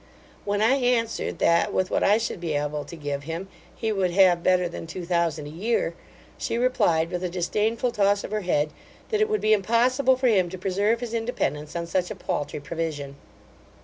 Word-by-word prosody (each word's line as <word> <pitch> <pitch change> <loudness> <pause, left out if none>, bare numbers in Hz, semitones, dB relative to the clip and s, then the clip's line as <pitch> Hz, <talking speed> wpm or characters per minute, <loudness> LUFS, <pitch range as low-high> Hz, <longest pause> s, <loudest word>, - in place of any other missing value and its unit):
When 205 +1 +1
I 260 +5 +4
answered, 245 -3 0
that, 170 0 +3
with 185 0 0
what - - +1
I 205 - +5
should 225 -5 -3
be 165 -3 -2
able 145 0 -2
to - - -9
give 145 -3 -4
him, 165 +4 -5 0.3
he 225 -1 -2
would 195 -3 +1
have 175 -1 +4
better 180 0 +3
than 170 -1 -7
two 175 +2 -6
thousand 170 -3 0
a 145 - -8
year, 190 +1 -1 0.5
she 230 - -2
replied, 170 -10 +2
with 180 0 -3
a 180 - -1
disdainful 210 +7 0
toss 200 -2 +2
of - - -7
her 215 0 -1
head, 150 -5 0 0.4
that 430 -2 +1
it 430 - +3
would 430 0 0
be 215 - +4
impossible 245 +6 +3
for 255 0 +1
him 190 -6 +3
to 185 - -7
preserve 200 +5 0
his 235 -2 -5
independence 225 -11 -2
on 170 0 -2
such 180 +1 -1
a - - -5
paultry 145 0 -3
provision. 145 -2 -4
185 Hz, 205 wpm, -25 LUFS, 165-225 Hz, 0.5 s, I